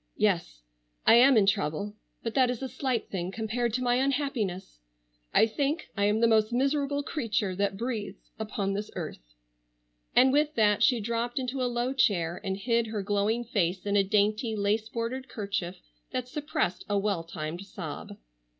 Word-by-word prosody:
"Yes, -, -, 0 dB, 0.4 s
I -, -, +7 dB
am 250 Hz, +2 st, +7 dB
in 205 Hz, -, +5 dB
trouble. 200 Hz, 0 st, 0 dB, 0.3 s
But 230 Hz, -, -3 dB
that 260 Hz, -2 st, +4 dB
is 250 Hz, +1 st, -3 dB
a -, -, -1 dB
slight 260 Hz, -1 st, -2 dB
thing 185 Hz, -1 st, -3 dB
compared 225 Hz, +3 st, -1 dB
to 255 Hz, -, -1 dB
my 245 Hz, 0 st, +3 dB
unhappiness. 255 Hz, -, -1 dB, 0.5 s
I -, -, +5 dB
think 280 Hz, +8 st, -2 dB
I 200 Hz, 0 st, +1 dB
am 210 Hz, +2 st, +2 dB
the 230 Hz, -, +6 dB
most 220 Hz, 0 st, +3 dB
miserable 280 Hz, +3 st, +1 dB
creature 220 Hz, -, -1 dB
that 200 Hz, -1 st, 0 dB
breathes 215 Hz, -4 st, -5 dB
upon 205 Hz, -2 st, -2 dB
this 205 Hz, +1 st, -3 dB
earth." -, -, -7 dB, 0.8 s
And 260 Hz, +1 st, +6 dB
with 300 Hz, +1 st, +2 dB
that 210 Hz, -2 st, +3 dB
she 250 Hz, -6 st, +4 dB
dropped 235 Hz, +3 st, -2 dB
into 260 Hz, 0 st, -2 dB
a 250 Hz, -, +1 dB
low 245 Hz, +2 st, -1 dB
chair 180 Hz, -9 st, +1 dB
and 190 Hz, -1 st, -2 dB
hid 230 Hz, +2 st, +1 dB
her 215 Hz, -2 st, -3 dB
glowing 205 Hz, +4 st, +1 dB
face 190 Hz, -5 st, -1 dB
in 205 Hz, 0 st, 0 dB
a 200 Hz, -, +5 dB
dainty, 215 Hz, +3 st, +1 dB
lace 215 Hz, +2 st, 0 dB
bordered 250 Hz, +3 st, -4 dB
kerchief 195 Hz, -4 st, -3 dB, 0.3 s
that 250 Hz, -1 st, -3 dB
suppressed 295 Hz, -, -2 dB
a 205 Hz, -, +2 dB
well 200 Hz, -4 st, 0 dB
timed 165 Hz, +1 st, -5 dB
sob. 185 Hz, -6 st, -7 dB
220 Hz, 175 wpm, -28 LUFS, 195-250 Hz, 0.8 s, I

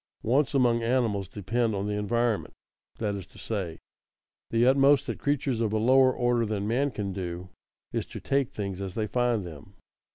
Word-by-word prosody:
_Wants 140 Hz, +5 st, +2 dB
among 120 Hz, -3 st, +3 dB
animals 115 Hz, -5 st, 0 dB
depend 110 Hz, +4 st, -1 dB
on 100 Hz, 0 st, -2 dB
the 105 Hz, -, -2 dB
environment; 115 Hz, +2 st, 0 dB, 0.4 s
that 105 Hz, -2 st, -1 dB
is 100 Hz, -4 st, -6 dB
to -, -, -19 dB
say, 95 Hz, -7 st, -4 dB, 0.7 s
the 115 Hz, +1 st, +3 dB
utmost 135 Hz, +1 st, +5 dB
that -, -, -4 dB
creatures 140 Hz, -4 st, 0 dB
of 110 Hz, -2 st, 0 dB
a -, -, +2 dB
lower 130 Hz, +4 st, +5 dB
order 120 Hz, -1 st, +1 dB
than 105 Hz, -2 st, -2 dB
man 130 Hz, +6 st, +1 dB
can 100 Hz, -6 st, -4 dB
do 90 Hz, -1 st, -5 dB, 0.4 s
is -, -, -2 dB
to -, -, -8 dB
take 135 Hz, -2 st, 0 dB
things 100 Hz, -2 st, -4 dB
as 95 Hz, -2 st, -5 dB
they 110 Hz, -, 0 dB
find 120 Hz, -3 st, 0 dB
them. 85 Hz, +4 st, -11 dB
115 Hz, 185 wpm, -27 LUFS, 100-125 Hz, 0.7 s, utmost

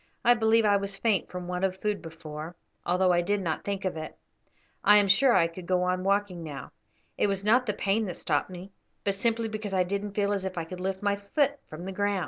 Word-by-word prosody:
"I 240 Hz, -, +8 dB
believe 225 Hz, -1 st, +3 dB
I 205 Hz, -1 st, +5 dB
was 200 Hz, 0 st, -4 dB
faint 210 Hz, -3 st, +1 dB
from 180 Hz, -1 st, -6 dB
want 180 Hz, +1 st, -3 dB
of 190 Hz, 0 st, 0 dB
food 210 Hz, -1 st, -1 dB
before, 160 Hz, 0 st, -8 dB, 0.3 s
although 180 Hz, +1 st, +3 dB
I 175 Hz, -, +3 dB
did 205 Hz, +4 st, 0 dB
not 165 Hz, -5 st, -2 dB
think 200 Hz, -1 st, -3 dB
of 185 Hz, -, -1 dB
it. 155 Hz, 0 st, -7 dB, 0.7 s
I 210 Hz, -, +7 dB
am 205 Hz, -1 st, +4 dB
sure 245 Hz, +7 st, +5 dB
I 175 Hz, -5 st, +5 dB
could 170 Hz, +1 st, -7 dB
go 180 Hz, -1 st, +2 dB
on 180 Hz, 0 st, 0 dB
walking 200 Hz, -2 st, 0 dB
now. 145 Hz, -3 st, -7 dB, 0.5 s
It -, -, +3 dB
was 195 Hz, -1 st, -2 dB
not 245 Hz, +4 st, +3 dB
the 210 Hz, -, +1 dB
pain 205 Hz, +2 st, 0 dB
that 180 Hz, -4 st, -5 dB
stopped -, -, 0 dB
me, 185 Hz, +2 st, -9 dB, 0.3 s
but 200 Hz, -, +1 dB
simply 230 Hz, +3 st, 0 dB
because 215 Hz, -2 st, -4 dB
I 185 Hz, -, +4 dB
didn't 200 Hz, +2 st, -4 dB
feel 205 Hz, -1 st, +1 dB
as 195 Hz, -2 st, -2 dB
if 190 Hz, -1 st, -4 dB
I 165 Hz, -, -2 dB
could 180 Hz, +2 st, -8 dB
lift 190 Hz, +1 st, -3 dB
my 200 Hz, 0 st, +1 dB
foot 280 Hz, +8 st, 0 dB
from 160 Hz, +3 st, -8 dB
the 190 Hz, -, -4 dB
ground. 205 Hz, 0 st, 0 dB
195 Hz, 245 wpm, -28 LUFS, 180-205 Hz, 0.7 s, I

